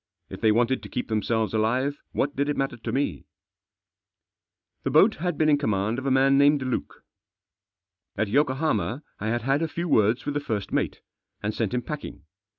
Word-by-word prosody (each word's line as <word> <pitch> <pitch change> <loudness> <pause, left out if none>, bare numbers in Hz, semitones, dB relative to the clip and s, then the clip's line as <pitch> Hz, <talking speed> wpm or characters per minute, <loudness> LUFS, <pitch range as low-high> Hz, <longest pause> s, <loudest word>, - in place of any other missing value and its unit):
If - - -8
they 110 -1 +4
wanted 120 +4 +2
to - - -10
keep 125 - -4
theni 110 -2 0
selves 110 -2 0
alive, 125 +6 0
what 145 +1 -1
did 140 +1 0
it 145 - -1
matter 135 -2 -1
to 115 - -5
me? 140 +2 -1 1.6
The - - -2
boat - - +5
had 175 0 -2
been 155 - +2
in 145 -2 +4
command 110 -2 0
of 135 - -5
a - - +3
man 135 +1 +4
named 145 -1 +4
Luke. 130 -2 -4 1.1
At 110 +1 +1
Yokohama 140 +2 0 0.2
I 105 - -3
had 120 +1 -1
had 135 +4 +1
a 165 - +1
few 170 +2 -4
words 110 -4 +2
with 145 - -2
the 145 - 0
first 110 -8 -3
mate, - - -1 0.4
and 105 +1 -1
sent 115 +1 -1
him 125 - -1
packing. 150 - -7
130 Hz, 195 wpm, -25 LUFS, 110-145 Hz, 1.6 s, boat